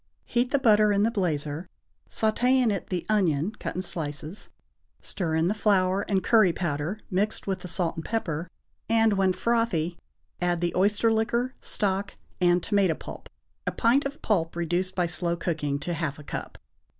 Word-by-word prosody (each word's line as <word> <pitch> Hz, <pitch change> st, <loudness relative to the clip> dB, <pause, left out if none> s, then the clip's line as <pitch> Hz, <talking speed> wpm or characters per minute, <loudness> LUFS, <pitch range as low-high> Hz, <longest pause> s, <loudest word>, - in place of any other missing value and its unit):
Heat 245 Hz, +1 st, 0 dB
the 280 Hz, -, +2 dB
butter 215 Hz, -5 st, +5 dB
in 200 Hz, 0 st, +3 dB
the 225 Hz, -, +2 dB
blazer, 160 Hz, -5 st, -2 dB, 0.4 s
sauté 235 Hz, +4 st, +2 dB
in 250 Hz, -4 st, +3 dB
it 195 Hz, -4 st, -3 dB
the 180 Hz, -2 st, -3 dB
onion 185 Hz, -5 st, +2 dB
cut -, -, -4 dB
in 185 Hz, -, -2 dB
slices, 155 Hz, +2 st, -5 dB, 0.5 s
stir 165 Hz, -5 st, -3 dB
in 160 Hz, +1 st, +2 dB
the 200 Hz, -, +2 dB
flour 195 Hz, -3 st, +2 dB
and 195 Hz, -2 st, +1 dB
curry 215 Hz, -6 st, +5 dB
powder 165 Hz, +2 st, -2 dB
mixed 200 Hz, +3 st, 0 dB
with 195 Hz, -1 st, -2 dB
the 180 Hz, -, -8 dB
salt 170 Hz, -1 st, -1 dB
and 165 Hz, -, -4 dB
pepper, 170 Hz, -7 st, -2 dB, 0.4 s
and, 225 Hz, -1 st, +4 dB
when 195 Hz, -1 st, +3 dB
frothy, 185 Hz, -7 st, 0 dB, 0.4 s
add 175 Hz, -1 st, +1 dB
the 175 Hz, 0 st, -1 dB
oyster 210 Hz, +4 st, +3 dB
liquor, 235 Hz, +3 st, 0 dB
stock 200 Hz, -1 st, -1 dB, 0.2 s
and 175 Hz, -1 st, +3 dB
tomato 195 Hz, -5 st, +2 dB
pulp -, -, -10 dB, 0.4 s
(a -, -, +2 dB
pint 250 Hz, +5 st, +3 dB
of 280 Hz, +2 st, -5 dB
pulp 170 Hz, -7 st, 0 dB
reduced 175 Hz, +2 st, -1 dB
by 180 Hz, -, +2 dB
slow 170 Hz, 0 st, -1 dB
cooking 155 Hz, -5 st, -2 dB
to 160 Hz, +5 st, -4 dB
half 160 Hz, -4 st, -2 dB
a 150 Hz, -, -11 dB
cup). -, -, -6 dB
185 Hz, 175 wpm, -27 LUFS, 170-215 Hz, 0.5 s, butter